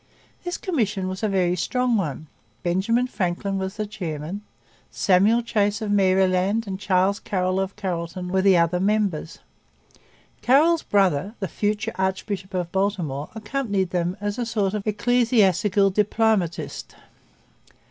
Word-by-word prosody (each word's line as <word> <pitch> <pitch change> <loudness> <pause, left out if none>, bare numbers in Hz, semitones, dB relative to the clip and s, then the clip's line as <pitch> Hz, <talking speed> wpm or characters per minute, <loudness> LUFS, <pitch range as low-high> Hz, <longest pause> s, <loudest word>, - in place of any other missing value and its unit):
This 355 -1 -3
commission 215 - -1
was 185 0 -5
a 215 - 0
very 180 -2 +1
strong 250 +6 0
one. 160 -6 -2 0.4
Benjamin 200 +8 +1
Franklin 195 -3 -2
was 190 +2 -4
the 215 - -2
chairman. 180 -3 -5 0.5
Samuel 205 +5 +3
Chase 205 -3 0
of 215 -2 -3
Maryland 190 +2 +2
and 190 -2 -5
Charles 190 +1 +1
Carroll 185 -1 -1
of 195 0 -3
Carrollton 180 -2 -4
were 190 +1 +1
the 190 -2 +5
other 170 +1 +2
members. 195 -5 0 1.0
Carroll's 310 +6 +4
brother, 195 0 +1
the 195 - -2
future 210 +5 -2
archbishop 190 0 -2
of 175 -2 -2
Baltimore, 180 -8 -1
accompanied 210 -5 -2
them 180 +1 -1
as 205 +2 -3
a - - 0
sort 210 -4 0
of 210 0 -4
ecclesiastical 210 -3 +3
diplomatist. 210 -3 0
195 Hz, 135 wpm, -23 LUFS, 185-215 Hz, 1.0 s, the